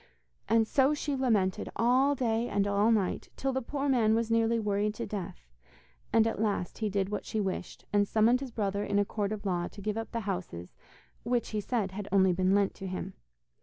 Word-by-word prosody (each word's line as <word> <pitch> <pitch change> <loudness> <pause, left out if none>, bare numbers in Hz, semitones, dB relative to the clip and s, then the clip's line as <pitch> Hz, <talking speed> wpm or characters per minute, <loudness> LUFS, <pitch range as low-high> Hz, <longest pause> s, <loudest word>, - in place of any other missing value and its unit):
And 225 -1 +4
so 275 +4 +3
she 290 -1 -2
lamented 215 -8 +1
all 255 +5 +3
day 235 -2 0
and 200 -1 +1
all 205 +2 +3
night, 205 -5 0
till 270 0 -1
the 265 - -1
poor 280 +3 -3
man 230 -5 +3
was 230 0 0
nearly 230 0 +3
worried 210 0 0
to - - -4
death; 180 - -6 0.6
and 225 -1 +4
at 225 -1 -1
last 205 -5 -1
he 215 -2 0
did 195 -1 -1
what 210 - -3
she 220 - -3
wished, 190 -3 -4
and 205 0 +3
summoned 225 +4 +3
his 270 -1 -6
brother 205 -3 -2
in 205 - 0
a 205 - +3
court 205 0 -2
of 210 -1 -5
law 175 -2 0
to - - -12
give 210 +2 -2
up 225 - -5
the 230 - -2
houses 180 - -5 0.5
which, 240 0 -1
he 215 -1 -2
said, 205 -3 -1
had 200 +1 -6
only 190 -2 +4
been 185 +2 +2
lent 200 -1 +2
to 195 - -7
him. 185 +1 -5
210 Hz, 215 wpm, -30 LUFS, 195-230 Hz, 0.6 s, And